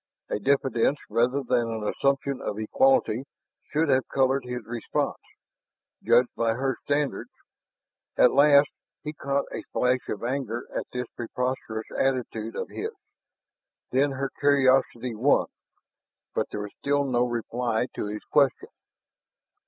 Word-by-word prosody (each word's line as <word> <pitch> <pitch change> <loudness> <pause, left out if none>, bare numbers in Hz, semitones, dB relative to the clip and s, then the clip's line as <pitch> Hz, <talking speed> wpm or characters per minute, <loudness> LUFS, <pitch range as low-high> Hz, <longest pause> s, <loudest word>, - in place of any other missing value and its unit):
A - - -1
diffidence 135 +1 +2
rather 125 +5 +2
than 120 -2 +1
an 110 -2 -3
assumption 140 +1 0
of 105 - -3
equality 135 - +2 0.5
should 160 +2 +2
have 130 -1 +3
colored 135 0 +1
his 125 -2 -5
response, 120 0 -2 0.8
judged 125 0 +3
by 115 -1 +1
her 135 +1 -1
standards. 145 0 -1 0.9
At 125 - +6
first, 140 0 +6 0.3
he 150 - -4
caught 140 -1 -1
a - - -4
flash 125 +1 +2
of 105 - -4
anger 120 -2 -3
at - - -2
this 125 0 -3
preposterous 120 -2 -3
attitude 120 -4 -1
of - - -4
his; 435 - -4 1.0
then 135 +2 +2
her 135 0 -3
curiosity 130 -4 +3
won, 125 +6 +3 0.9
but - - 0
there 105 - -4
was 105 -1 -7
still 145 0 +1
no 125 -3 +1
reply 120 -1 -1
to - - -3
his 105 +1 -5
question. 140 -3 +3
130 Hz, 135 wpm, -26 LUFS, 115-140 Hz, 1.0 s, At